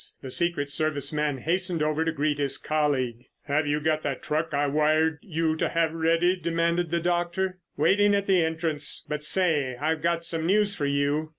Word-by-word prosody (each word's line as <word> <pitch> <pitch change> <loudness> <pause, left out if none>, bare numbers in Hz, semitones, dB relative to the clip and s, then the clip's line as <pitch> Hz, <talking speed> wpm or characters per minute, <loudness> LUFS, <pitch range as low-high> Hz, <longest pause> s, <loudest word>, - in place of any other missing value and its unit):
The 130 - -6
secret 170 -3 0
service 145 -1 0
man 150 -2 0
hastened 175 +2 0
over 155 +1 0
to 165 - 0
greet 150 -1 -1
his 140 -2 +1
colleague. 135 -6 -1 0.2
"Have 145 +1 0
you 145 +1 +1
got 155 0 0
that 140 -3 -4
truck 155 +2 -1
I 145 0 +1
wired 155 +2 +2
you 160 -3 -1
to - - 0
have 165 -1 0
ready?" 165 +2 +2
demanded 170 0 0
the 170 +1 0
doctor. 175 +2 -1 0.2
"Waiting 205 +1 +3
at 200 0 0
the 185 -4 +3
entrance; 160 -2 -2
but 150 0 -4
say, 150 -7 +2
I've 155 +3 -1
got 170 0 0
some 165 -1 -1
news 205 +1 +3
for 145 -7 -2
you." 140 +2 0
160 Hz, 190 wpm, -26 LUFS, 150-170 Hz, 0.2 s, Waiting